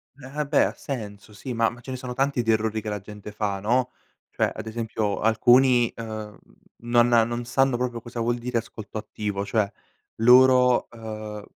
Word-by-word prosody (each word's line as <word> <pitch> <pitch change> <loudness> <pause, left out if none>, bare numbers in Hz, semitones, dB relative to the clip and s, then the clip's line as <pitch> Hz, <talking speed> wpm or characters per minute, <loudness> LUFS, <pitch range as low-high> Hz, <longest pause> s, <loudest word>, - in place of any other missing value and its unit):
Eh 140 -2 -14
ah 150 +3 -3
beh, 145 0 +3
ha - - -3
senso 105 -6 -7
sì, 125 +5 -6
ma 115 -1 +2
ma 120 - -12
ce 130 - -8
ne 130 - -4
sono 125 -1 -6
tanti 135 -1 +1
di 115 -1 +1
errori 110 0 0
che 110 - -5
la 105 0 -3
gente 105 +1 -10
fa, 100 -2 -2
no, 125 +5 +1 0.4
cioè - - 0
ad - - -7
esempio 110 -2 -2
alcuni, 120 +2 +4
ehm, 110 -2 -7 0.4
non 120 0 +2
a 115 -1 +6
non 120 +1 -3
sanno 135 0 +2
proprio 120 -1 -3
cosa 120 +1 -8
vuol 120 +1 0
dire 120 0 -3
ascolto 110 -1 -6
attivo. 105 -2 -4
Cioè 100 -1 0 0.5
loro, 125 +1 +6
uhm, 110 -2 -7
115 Hz, 190 wpm, -25 LUFS, 110-125 Hz, 0.5 s, a